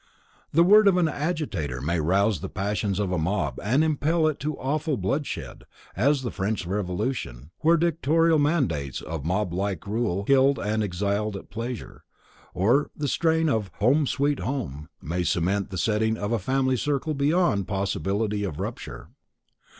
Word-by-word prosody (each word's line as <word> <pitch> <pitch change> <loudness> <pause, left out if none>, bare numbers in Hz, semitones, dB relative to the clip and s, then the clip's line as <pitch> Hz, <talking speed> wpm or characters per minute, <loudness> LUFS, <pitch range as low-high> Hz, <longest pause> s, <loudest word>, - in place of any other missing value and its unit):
The 165 +3 +5
word 210 +3 +7
of 190 -2 +5
an 175 -2 +3
agitator 145 - -2
may 80 +6 -1
rouse 95 +6 +2
the 95 - -6
passions 100 -1 -2
of 100 -3 -1
a 90 - 0
mob 80 -6 -1
and 130 +9 +3
impel 160 +1 +1
it 155 -2 0
to 150 0 -3
awful 150 +2 -1
bloodshed, 135 +10 -3 0.3
as 140 +7 +2
in - - -7
the 120 - -2
French 100 0 -2
Revolution, 90 - -3
where 165 +2 +4
dictatorial 165 0 +2
mandates 135 - 0
of 80 -3 -5
mob 90 +2 -1 0.3
rule 100 -3 -1
killed 135 +3 +4
and 110 +2 -1
exiled 100 +2 -1
at - - -13
pleasure, 115 +2 -6 0.5
or, 120 +10 +2
the 145 - -2
strain 160 +2 +2
of 110 -9 0
"Home, 135 +7 +3
Sweet 140 +3 0
Home" 80 - -4
may 85 +4 -2
cement 90 +3 0
the 95 - -5
setting 110 +4 +1
of 105 +1 -3
a 115 - +1
family 130 +4 +1
circle 145 +3 -1
beyond 140 - +1
possibility 100 +1 -1
of 85 -6 -4
rupture. 95 - -6
110 Hz, 160 wpm, -25 LUFS, 95-145 Hz, 0.5 s, word